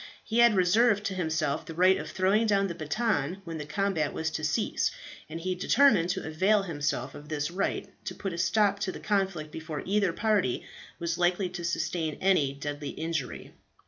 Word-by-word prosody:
He 230 +1 -1
had 235 -2 +6
reserved 205 +4 +4
to 200 - -2
himself 160 -5 -1
the 165 - -9
right 185 +2 +5
of - - -6
throwing 195 +4 +2
down 200 -2 +3
the 185 - -3
baton 175 - -1
when 165 -2 -6
the 150 - -5
combat 165 -4 0
was 160 0 -2
to 155 - -4
cease, 210 +8 +1 0.4
and 165 - -5
he 185 +2 -1
determined 185 -1 +4
to 190 +1 -2
avail 195 +6 +2
himself 145 -6 -2
of 150 +1 -11
this 150 +1 -2
right, 190 +3 -1 0.2
to - - -4
put 195 -3 -4
a - - -5
stop 200 +2 +2
to 195 -2 -1
the - - -8
conflict 190 -7 -1
before 160 -2 -6
either 200 -2 +2
party 205 - 0 0.3
was 170 0 -2
likely 180 +1 +2
to 175 -1 -6
sustain 165 -2 -1
any 185 -8 +3
deadly 145 +1 -5
injury. 160 -5 -4
175 Hz, 190 wpm, -28 LUFS, 155-195 Hz, 0.4 s, had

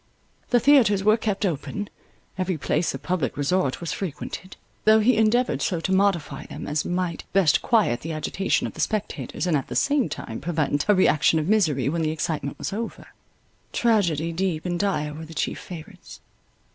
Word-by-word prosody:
The 245 - +4
theatres 230 -8 +5
were 215 +1 +5
kept 215 -2 -1
open; 195 +5 -3 0.5
every 185 -2 -1
place 155 +3 0
of - - -9
public 170 -10 -1
resort 145 -1 0
was 170 -3 -4
frequented; 185 +1 -6 0.3
though 220 +1 +6
he 235 +3 +4
endeavoured 225 +3 +2
so 175 -4 0
to 190 - -2
modify 190 -8 +1
them, - - -7
as 150 +1 -1
might 175 -1 -2
best 185 -7 +4
quiet 210 - +2
the 165 - -5
agitation 160 +5 -1
of - - -5
the - - -5
spectators, 215 -4 -2
and 175 -3 +2
at 135 - -1
the - - -6
same 285 -3 +2
time 110 - -6
prevent 155 0 -1
a 210 - +6
reaction 160 -4 +4
of 155 0 -1
misery 160 - +2
when 165 +4 0
the 155 - +1
excitement 155 -3 -3
was - - -4
over. 225 +3 -5 0.6
Tragedies 170 -8 +1
deep 180 -4 -1
and 175 -1 -1
dire 150 -7 0
were 160 +2 -8
the 160 +1 -12
chief - - -2
favourites. 170 -4 -10
180 Hz, 185 wpm, -24 LUFS, 155-205 Hz, 0.6 s, though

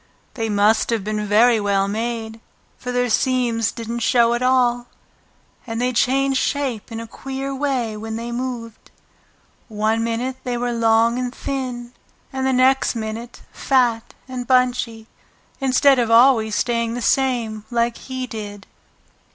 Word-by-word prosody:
They 225 -3 -3
must 210 +2 +3
have 230 -4 0
been 210 0 -3
very 225 +3 +5
well 200 -1 +1
made, 225 +1 -3 0.4
for 250 - -6
their 245 0 +1
seams 240 -2 +1
didn't 230 0 -5
show 235 0 +3
at 240 - -1
all, 245 -1 +2 0.8
and 225 0 -3
they 250 +1 0
changed 270 +2 +2
shape 260 -7 -2
in 225 - -5
a 230 - -6
queer 270 +3 -6
way 260 -5 -1
when 220 +1 -6
they 235 +1 -5
moved; 240 -2 -5 0.8
one 220 0 0
minute 240 +3 -2
they 245 -1 -2
were 245 0 -1
long 230 +1 +3
and 250 -1 -2
thin 250 -2 -5 0.4
and 265 0 -1
the - - +2
next 260 0 +3
minute 225 +2 -6
fat 240 -4 0
and 250 -1 -6
bunchy, 250 -3 +1 0.5
instead 270 0 +4
of 235 -2 +1
always 230 -2 +5
staying 235 0 0
the 245 - -4
same 235 -5 0
like 235 -1 0
he 260 -1 -5
did. 205 -4 -8
240 Hz, 150 wpm, -21 LUFS, 225-255 Hz, 0.8 s, very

